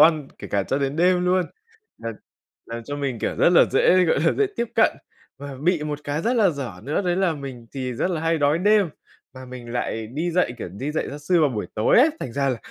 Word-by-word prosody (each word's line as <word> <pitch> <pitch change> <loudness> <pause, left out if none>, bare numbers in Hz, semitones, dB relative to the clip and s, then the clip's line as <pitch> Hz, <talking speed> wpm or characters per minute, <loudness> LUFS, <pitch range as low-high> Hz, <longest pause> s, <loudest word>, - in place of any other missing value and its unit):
ăn, 155 -3 +5
kể - - -8
cả 100 - +1
cho 135 +8 -1
đến 140 +1 -2
đêm 180 +1 +3
luôn, 180 +1 +3 0.6
làm 115 -1 -5 0.5
làm 115 0 -6
cho 145 +4 -5
mình, 135 -4 -3
kiểu, - - -2
rất - - +5
là 175 - +7
dễ, 185 0 +4
gọi 160 - +2
là, 165 - +3
dễ 420 - +2
tiếp 235 - -1
cận. 225 - +3 0.4
Và 140 0 -7
bị 175 -1 +2
một 150 -1 -3
cái 145 +2 -2
rất 240 +6 +1
là 215 -4 +5
dở 140 -7 -5
nữa, 145 - -1
đấy 175 -2 0
là 190 -3 +2
mình 135 -5 -8
thì 130 -2 -3
rất 180 - -1
là 170 -3 -2
hay 165 0 +1
đói 145 +2 +2
đêm, 205 0 +3 0.5
mà 130 0 -9
mình 125 -2 -9
lại 115 -2 -2
đi 155 +10 -3
dạy, 175 -7 +1
kiểu, 110 - -5
đi 120 - -5
dạy 155 - -2
gia 145 - -7
sư 170 +4 +2
vào 150 - +4
buổi 105 -4 -3
tối 110 - +4
ấy. 285 +6 +6
Thành 115 - -5
ra 140 +1 0
là 130 - 0
145 Hz, 255 wpm, -23 LUFS, 130-180 Hz, 0.6 s, là